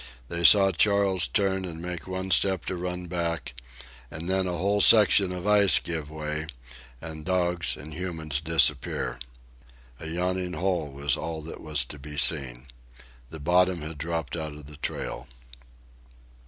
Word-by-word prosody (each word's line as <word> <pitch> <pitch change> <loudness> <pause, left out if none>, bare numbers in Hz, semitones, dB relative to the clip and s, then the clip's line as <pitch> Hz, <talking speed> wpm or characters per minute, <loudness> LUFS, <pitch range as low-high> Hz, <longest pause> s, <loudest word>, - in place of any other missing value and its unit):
They 85 0 -3
saw 95 +3 +7
Charles 95 0 +3
turn 95 -3 0
and 85 -3 -6
make 90 0 -6
one 95 0 -4
step 95 0 +2
to - - -3
run 90 0 -4
back, 85 -5 -3 0.6
and 80 +3 -7
then 95 0 +1
a 90 -1 -3
whole 100 +4 +1
section 100 -3 +6
of 90 0 -6
ice 105 -2 +5
give 80 -4 -4
way 75 0 -5 0.5
and 80 0 -8
dogs 90 0 0
and 75 +1 -9
humans 80 -4 -4
disappear. 80 -4 +1 0.8
A 80 - -7
yawning 90 +2 -2
hole 90 -5 -1
was 70 0 -1
all 80 -1 -5
that 80 - -9
was 75 -5 +2
to 75 - -10
be 75 +1 -9
seen. 65 -3 +1 0.6
The 80 - -9
bottom 90 +2 +2
had 75 -1 -8
dropped 80 0 -3
out 80 -3 -5
of 75 -1 -12
the 75 0 -13
trail. 70 -2 -5
85 Hz, 155 wpm, -26 LUFS, 75-95 Hz, 0.8 s, saw